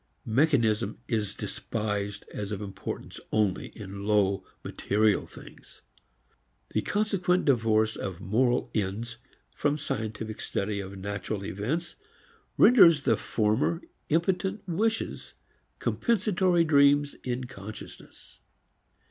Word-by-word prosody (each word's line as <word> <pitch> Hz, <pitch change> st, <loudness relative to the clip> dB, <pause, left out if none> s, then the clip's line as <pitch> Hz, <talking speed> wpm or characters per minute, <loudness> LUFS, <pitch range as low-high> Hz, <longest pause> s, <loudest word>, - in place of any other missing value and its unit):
Mechanism 120 Hz, -4 st, +2 dB
is 105 Hz, -3 st, -1 dB
despised 105 Hz, -2 st, -3 dB
as 105 Hz, -1 st, -4 dB
of 105 Hz, -, -3 dB
importance 100 Hz, -2 st, -6 dB
only 105 Hz, -4 st, +1 dB
in 100 Hz, -2 st, -7 dB
low 100 Hz, -3 st, +2 dB, 0.2 s
material 105 Hz, 0 st, +1 dB
things. -, -, -14 dB, 0.9 s
The -, -, +1 dB
consequent 195 Hz, -4 st, +1 dB
divorce 110 Hz, -4 st, +3 dB
of 95 Hz, -3 st, -5 dB
moral 120 Hz, +5 st, +1 dB
ends 110 Hz, +4 st, -2 dB, 0.4 s
from 145 Hz, 0 st, 0 dB
scientific 110 Hz, -5 st, -4 dB
study 100 Hz, +1 st, -2 dB
of 95 Hz, 0 st, -7 dB
natural 100 Hz, +1 st, -4 dB
events 130 Hz, -, -3 dB, 0.6 s
renders 170 Hz, -, +7 dB
the -, -, +3 dB
former 110 Hz, +10 st, 0 dB, 0.3 s
impotent 190 Hz, +5 st, 0 dB
wishes, 220 Hz, +6 st, -1 dB, 0.4 s
compensatory 190 Hz, -6 st, +2 dB
dreams 145 Hz, -2 st, +4 dB
in 125 Hz, 0 st, -2 dB
consciousness. 110 Hz, -4 st, -11 dB
110 Hz, 100 wpm, -28 LUFS, 105-160 Hz, 0.9 s, renders